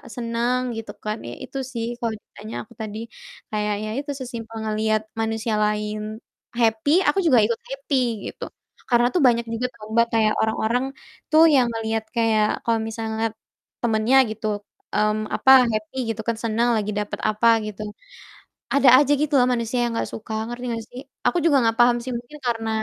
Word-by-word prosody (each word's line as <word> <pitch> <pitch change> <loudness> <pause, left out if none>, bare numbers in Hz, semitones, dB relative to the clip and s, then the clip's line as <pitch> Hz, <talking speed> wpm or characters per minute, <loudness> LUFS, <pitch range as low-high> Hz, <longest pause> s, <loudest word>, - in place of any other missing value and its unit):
seneng 240 +1 0 0.2
gitu 225 - -6
kan, 215 +1 -1
ya 120 - -6
itu 270 - -7 0.2
sih 230 -1 -2
kalo 230 -1 -1
ditanya 110 +2 -10
aku - - -19
tadi 215 -1 -5 0.5
kayak 210 -1 0
ya 215 - -4
itu, 290 0 -4
sesimpel 230 -3 -7
ngelihat 215 0 0 0.2
manusia 225 0 -1
lain 210 +1 -3 0.4
happy, 230 +3 +1 0.2
aku 390 - +3
juga 260 -7 +6
ikut 230 0 0
happy 275 +1 -2 0.3
gitu. - - -10 0.5
Karena 240 -1 +4
tuh 355 - +2
banyak 235 -1 +2
juga 240 +2 -2
tau, 210 - -12
Mbak, 235 0 +4
kayak 215 -1 +3
orang-orang 220 +3 0 0.5
tuh 315 +1 +7
yang 255 -3 +5
ngelihat 225 0 -2
kayak 220 -2 +3 0.2
kalau 230 -1 +1
misal 225 0 -5
ngelihat 220 0 -1 0.5
temennya 225 +3 +3
gitu, 215 0 -4 0.5
mmm, 215 0 +1
apa, 265 - +5 0.2
happy 215 +3 -4
gitu 220 0 -2
kan, 230 - +1
seneng 230 +2 +1
lagi 210 -1 -2
dapet 210 0 -3
apa 215 +2 +2 0.2
gitu. 215 0 -7 0.9
Ada 280 -2 +6
aja 290 - +1
gitu 300 0 -1
loh 250 - +5
manusia 235 0 -2
yang 235 - -2
enggak - - -2
suka, 220 0 -6 0.2
ngerti 240 +1 -6
enggak 230 -1 -2
sih? 250 - -9 0.3
Aku 355 - +3
juga 290 -4 +5
enggak 225 -1 +1
paham 240 0 +5
sih 255 - -6
mungkin 240 +5 -7
karena 225 -2 -1
225 Hz, 180 wpm, -23 LUFS, 215-240 Hz, 0.9 s, tuh